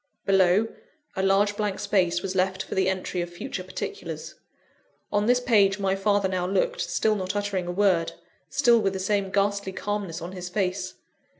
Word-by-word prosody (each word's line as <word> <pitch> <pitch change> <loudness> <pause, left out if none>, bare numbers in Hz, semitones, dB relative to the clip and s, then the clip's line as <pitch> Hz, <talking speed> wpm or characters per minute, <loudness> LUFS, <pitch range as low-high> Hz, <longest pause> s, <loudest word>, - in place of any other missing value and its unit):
Below, 195 +2 +4 0.5
a 190 - -1
large 195 +2 +3
blank 205 -2 -1
space 175 -4 +1
was 190 -1 -2
left 190 0 0
for - - -7
the 190 0 +2
entry 185 -1 -2
of 175 - -4
future 185 +2 -6
particulars. 405 - -6 0.8
On 205 +1 +1
this 245 0 +4
page 210 -6 +3
my 195 -1 0
father 200 0 +2
now 185 -1 -1
looked, - - 0
still 220 - +1
not 190 0 -3
uttering 200 -3 -1
a - - -2
word, 180 -3 +2 0.4
still 245 -4 +4
with 195 -3 0
the 190 - -3
same 195 0 0
ghastly 200 0 0
calmness 200 -5 -3
on 170 +2 -6
his 180 -1 -6
face. 185 -1 -2
195 Hz, 180 wpm, -26 LUFS, 185-205 Hz, 0.8 s, Below